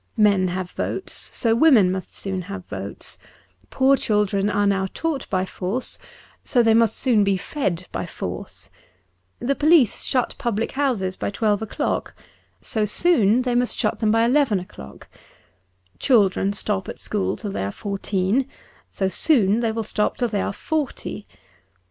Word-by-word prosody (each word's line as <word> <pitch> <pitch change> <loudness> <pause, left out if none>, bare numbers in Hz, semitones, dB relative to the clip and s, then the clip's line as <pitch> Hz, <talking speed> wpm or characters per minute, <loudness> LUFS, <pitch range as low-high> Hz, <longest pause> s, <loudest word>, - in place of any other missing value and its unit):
Men 200 -3 +4
have 180 0 -4
votes, - - -3
so 230 -3 +1
women 230 - +5
must 185 -1 -5
soon 190 -2 -3
have 200 -2 -6
votes; 100 0 -6 0.5
poor 270 +1 +4
children 205 -4 +1
are 200 -2 +1
taught 310 +6 -3
by 185 -1 0
force, 195 +7 -3 0.4
so 245 -3 +2
they 225 -1 +4
must 225 -1 +3
soon 235 -6 +3
be 195 -1 +2
fed 185 - -3
by - - -4
force; - - -6 0.7
the 260 +3 0
police 300 - +4
shut 255 -3 0
public 225 -2 -1
hoiises 235 -10 -1
by - - -1
twelve 210 0 0
o'clock, 220 - -2 0.5
so 220 - -1
soon 230 - +3
they 250 -1 0
must 245 0 +1
shut 215 - -1
them 220 - +1
by 225 +1 +3
eleven 255 -5 +3
o'clock: 70 - -12 0.9
children 200 -5 +3
stop 200 -1 -1
at - - -7
school 205 -2 -1
till 205 -3 -5
they 195 - -3
are 100 - -2
fourteen, 200 - -1 0.4
so 190 - -1
soon 215 - +3
they 230 -2 0
will 225 0 -3
stop 210 0 -1
till 245 -2 0
they 205 -2 -1
are - - -1
forty. 300 +7 -4
210 Hz, 155 wpm, -22 LUFS, 195-245 Hz, 0.9 s, women